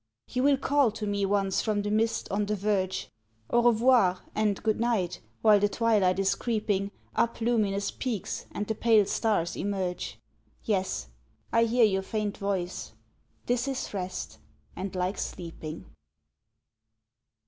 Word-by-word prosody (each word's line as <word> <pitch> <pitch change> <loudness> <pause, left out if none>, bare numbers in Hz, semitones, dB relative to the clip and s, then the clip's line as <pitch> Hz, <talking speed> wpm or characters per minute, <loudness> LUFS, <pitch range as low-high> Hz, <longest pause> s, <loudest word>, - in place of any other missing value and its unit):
You 250 - -1
will 280 +1 +4
call 280 -1 +3
to 220 -1 -4
me 200 -1 0
once 195 -1 +1
from 210 -2 0
the 205 - -2
mist, 225 +1 +1
on 205 +1 0
the 210 - 0
verge, 190 -2 -1 0.4
"An 240 - +4
revoir!" 235 -5 +4
and 210 -2 0
"Good 215 -1 +1
night!" 220 -7 0 0.2
while 215 -2 +7
the 205 +1 +2
twilight 205 -5 +2
is 195 0 +2
creeping 210 -4 -1 0.3
Up 230 - +1
luminous 215 -4 +1
peaks, 235 -7 -4
and 205 - -3
the 220 - -1
pale 220 -2 +4
stars 200 -4 0
emerge? 190 -3 -3 0.5
Yes, 185 - -1 0.4
I 230 0 +5
hear 235 +1 +4
your 195 -2 +1
faint 210 +1 -2
voice: 190 -3 -3 0.5
"This 245 +2 0
is 270 -5 -3
rest, 180 - -5 0.4
and 190 0 -5
like 185 +2 -1
sleeping!" 165 -3 -6
205 Hz, 145 wpm, -28 LUFS, 190-230 Hz, 0.5 s, while